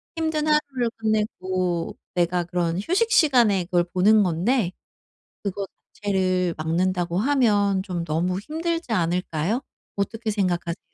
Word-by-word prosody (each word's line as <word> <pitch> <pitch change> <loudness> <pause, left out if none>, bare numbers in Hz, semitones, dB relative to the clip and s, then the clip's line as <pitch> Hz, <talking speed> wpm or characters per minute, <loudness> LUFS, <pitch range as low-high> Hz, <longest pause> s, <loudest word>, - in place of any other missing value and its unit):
힘든 315 -2 -1
하루를 285 -5 +1
끝내고 185 -6 -1 0.2
내가 175 0 +1
그런 170 -1 -1
휴식 380 - +1
시간에 240 - +4
그걸 175 -1 +2
보는 200 +4 +4
건데 185 +4 +1 0.7
그거 200 0 -3 0.3
자체를 185 -3 0
막는다고 175 +2 0
하면 205 -6 +2
좀 180 -4 -3
너무 170 +3 -1
힘들지 330 +3 -3
않을까요? 180 +2 0 0.4
어떻게 220 +3 -2
생각하세요? 180 -4 -1
195 Hz, 285 characters per minute, -24 LUFS, 175-235 Hz, 0.7 s, 시간에